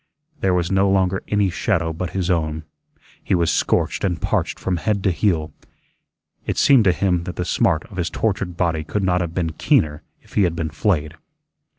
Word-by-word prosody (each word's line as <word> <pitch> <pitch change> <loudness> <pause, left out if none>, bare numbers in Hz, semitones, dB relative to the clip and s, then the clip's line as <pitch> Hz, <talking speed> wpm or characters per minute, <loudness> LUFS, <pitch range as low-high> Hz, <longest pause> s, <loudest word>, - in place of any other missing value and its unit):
There 95 -2 +2
was 85 0 0
no 95 0 +3
longer 95 -1 +1
any 105 -3 +1
shadow 80 -1 0
but 90 +2 -4
his 90 -1 0
own. 80 -2 -1 0.6
He - - +1
was 85 -2 +2
scorched - - 0
and 90 -4 0
parched - - -1
from 95 -2 -2
head 100 +3 -1
to 95 - +3
heel. 85 -5 0 0.9
It - - -3
seemed 130 -6 +5
to 95 - +6
him 90 -2 0
that 90 - -5
the 90 - -3
smart 80 -2 +1
of 100 -5 -13
his 85 -2 -1
tortured 95 -5 -2
body 85 -3 0
could 100 +6 -2
not 90 -1 +2
have 85 -1 -4
been 85 -3 -1
keener 75 -1 +1 0.2
if - - -22
he - - +2
had 85 -3 +2
been 80 -1 -3
flayed. 80 -3 0
90 Hz, 200 wpm, -21 LUFS, 80-95 Hz, 0.9 s, to